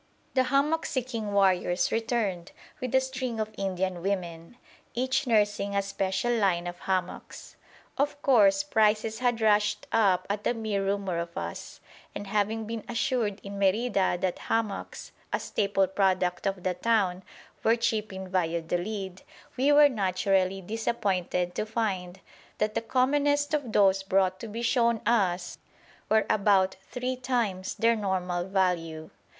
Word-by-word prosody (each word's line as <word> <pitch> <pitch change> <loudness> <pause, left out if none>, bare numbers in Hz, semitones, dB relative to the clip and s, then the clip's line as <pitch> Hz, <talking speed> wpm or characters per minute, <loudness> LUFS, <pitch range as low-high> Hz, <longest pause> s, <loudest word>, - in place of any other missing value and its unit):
The 260 -1 +3
hammock 295 +5 +1
seeking 240 -6 -3
warriors 185 -3 +2
returned 220 -6 -1 0.3
with 255 -1 -2
a - - +7
string 260 -3 -4
of 215 0 -3
Indian 185 -2 -2
women, 175 0 -4 0.4
each 260 +3 0
nursing 205 -3 +1
"a 200 - +2
special 195 +4 -1
line" 190 -6 +1
of 175 0 -6
hammocks. 185 -1 -4 0.4
Of 285 0 0
course 290 +2 +5
prices 220 -4 +1
had 240 -2 0
rushed 210 -1 +2
up 190 -4 +3
at 205 +1 -3
the 245 - +1
mere 215 -3 -2
rumour 195 -3 -1
of 170 0 -6
us, 85 0 -6 0.3
and 205 - -5
having 215 +2 -1
been 225 -1 -5
assured 230 -3 -1
in 200 0 -7
Merida 195 -1 +2
that 185 -2 -1
hammocks, 220 -3 -3 0.2
a - - 0
staple 200 -2 +1
product 185 -1 0
of 195 -2 -3
the 185 - 0
town, 190 -2 +1 0.4
were 225 - +4
cheap 220 -3 -1
in 190 0 -7
Valladolid, 180 +2 -2 0.3
we 270 +3 +3
were 290 0 +8
naturally 195 -4 0
disappointed 190 -4 -1
to - - -1
find 200 -5 -3 0.4
that 215 0 0
the - - -1
commonest 290 +4 +1
of 285 -6 -1
those 195 -2 +4
brought 190 -1 +1
to 230 - -7
be 225 +2 -5
shown 235 -1 +2
us 195 -6 +1 0.5
were 220 0 +3
about 195 -2 +3
three 250 +1 -2
times 235 -7 -2
their 230 +1 +3
normal 180 -4 -1
value. 170 -5 -1
205 Hz, 145 wpm, -28 LUFS, 185-230 Hz, 0.5 s, were